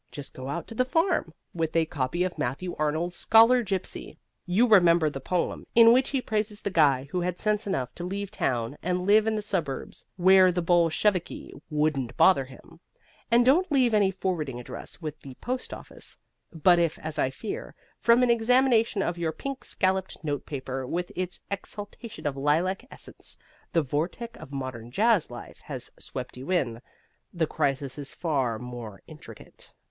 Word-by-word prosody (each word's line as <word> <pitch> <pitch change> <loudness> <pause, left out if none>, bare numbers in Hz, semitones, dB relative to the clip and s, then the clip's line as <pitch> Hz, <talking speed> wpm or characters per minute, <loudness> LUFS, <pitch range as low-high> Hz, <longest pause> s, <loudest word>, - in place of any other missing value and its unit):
Just 145 - -9
go 130 0 -8
out 170 +4 -3
to - - -8
the 255 - +2
farm, 325 - +1 0.2
with 165 -2 -2
a 165 -1 +4
copy 150 +3 -1
of 185 -1 -2
Matthew 155 +9 -3
Arnold's 160 +4 -1
"Scholar 230 +3 +6
Gipsy" 195 -4 -4 0.3
(you 205 +8 +3
remember 170 -7 +5
the 135 - -6
poem, 175 +6 -2
in 230 0 +8
which 260 +2 +3
he 270 -3 -1
praises 210 -1 -2
the 200 - -3
guy 140 -6 +3
who 180 - -1
had 180 0 -2
sense 210 -1 -1
enough 135 -9 -2
to 175 - -7
leave 200 +2 -4
town 125 - -2
and 180 +1 -1
live 215 +2 +5
in 220 - +1
the 210 - -2
suburbs 170 -9 -3
where 185 0 +6
the 175 - -1
Bolsheviki 175 +2 +1 0.2
wouldn't 150 -5 -1
bother 140 -8 +5
him), 130 -1 -16 0.5
and 240 +1 +4
don't 320 +8 +4
leave 255 -5 +3
any 205 -2 +4
forwarding 170 -9 -3
address 125 +7 -9
with 155 -1 -5
the 135 -2 -11
postoffice. 255 - -7 0.3
But 175 +1 +4
if, 165 -2 +1
as 155 0 -6
I 130 - +2
fear 395 - -6 0.2
from 235 +2 +5
an 245 - +4
examination 235 -3 +3
of 170 0 -2
your 165 -2 0
pink 275 - -6
scalloped 190 -1 -1
notepaper 135 -3 -4
with 175 +5 -3
its 180 -1 -3
exhalation 205 +2 -7
of 145 -2 -1
lilac 165 - 0
essence, - - -11 0.3
the 165 - +2
vortex 170 - -3
of 135 - -11
modern 130 -4 -5
jazz 210 - +2
life 120 -1 -10
has - - -5
swept - - -7
you 130 +5 -8
in, 125 -11 0 0.5
the 170 -3 0
crisis 140 -3 -2
is 140 -1 -5
far 135 -9 0
more 120 -5 -8
intricate. - - -14
175 Hz, 175 wpm, -27 LUFS, 145-210 Hz, 0.5 s, in